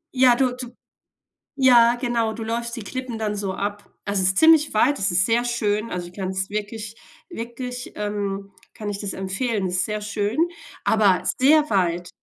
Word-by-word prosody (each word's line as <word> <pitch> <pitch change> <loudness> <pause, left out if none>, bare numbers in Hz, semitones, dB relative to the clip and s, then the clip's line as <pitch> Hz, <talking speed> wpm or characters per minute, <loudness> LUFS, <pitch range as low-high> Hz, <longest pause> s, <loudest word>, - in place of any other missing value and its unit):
ja, 250 -1 +6
du 250 -1 +1 1.0
ja, 240 -3 +6
genau, 230 -3 0
du 225 0 -6
läufst 235 +1 -3
die 230 - -6
Klippen 255 0 -5
dann 210 -1 -1
so 195 -2 -3
ab. 205 +1 -4 0.2
Also, 200 -1 0
es 185 - +4
ist 190 - -1
ziemlich 320 -3 +5
weit. 285 +7 +3
Es 195 -1 +1
ist 185 +2 +3
sehr 235 +2 +2
schön. 220 -2 -1
Also, 175 -1 -4
ich 175 - -15
kann 190 -1 -4
es 190 +1 -2
wirklich 215 +1 -5 0.3
wirklich, 245 -2 -6
ähm 200 -1 -3 0.2
kann 210 -1 -6
ich 200 -1 -4
das 200 -2 -4
empfehlen. 195 +2 -2
Es 180 0 -1
ist 180 - +2
sehr 210 0 -3
schön, 210 +3 -2 0.5
aber 205 -4 +3 0.2
sehr 300 +3 +5
weit. 175 -2 0
215 Hz, 185 wpm, -23 LUFS, 195-240 Hz, 1.0 s, ja